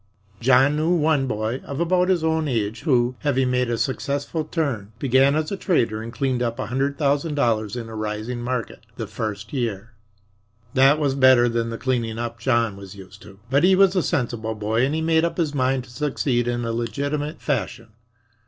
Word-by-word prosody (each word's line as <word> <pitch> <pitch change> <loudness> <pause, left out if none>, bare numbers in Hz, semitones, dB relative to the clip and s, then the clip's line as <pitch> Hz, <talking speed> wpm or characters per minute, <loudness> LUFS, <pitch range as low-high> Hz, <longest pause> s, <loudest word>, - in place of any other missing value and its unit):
John 130 +4 +4
knew 155 +2 +1
one 150 -4 +2
boy 110 +2 -2
of 140 - -6
about 180 +2 +2
his 180 -4 +2
own 160 -1 +1
age, 110 -4 -2
who, 125 -5 +2
having 135 -3 +1
made 125 -1 +1
a 120 - 0
successful 140 +5 -2
turn, 140 - -3
began 135 +2 +3
as 155 +2 -1
a - - -1
trader 115 - 0
and 115 +1 -7
cleaned 130 -1 -1
up 115 -1 -1
a - - -3
hundred 135 +3 -1
thousand 145 +1 0
dollars 110 -6 0
in 120 -2 -5
a 110 - -9
rising 110 +3 -4
market 125 -1 -4
the - - -3
first 105 +1 -5
year. 115 -4 -3 0.8
That 135 +3 +5
was 145 -3 0
better 130 -2 +5
than 115 -1 -1
the 115 - -5
cleaning 115 -4 -1
up 120 0 -4
John 115 -4 +1
was 100 0 -10
used 100 0 -13
to. 95 - -14
But 140 +3 +3
he 190 +1 +6
was 195 0 +4
a 185 - +3
sensible 115 -6 -2
boy 110 +3 0
and 145 - -2
had 160 - -1
made 160 0 +3
up 170 - -1
his 160 -4 0
mind 130 -1 0
to 120 - -16
succeed 130 -3 -1
in 120 0 -1
a 115 - -2
legitimate 145 +6 -3
fashion. 125 -5 -3
130 Hz, 200 wpm, -23 LUFS, 115-145 Hz, 0.8 s, he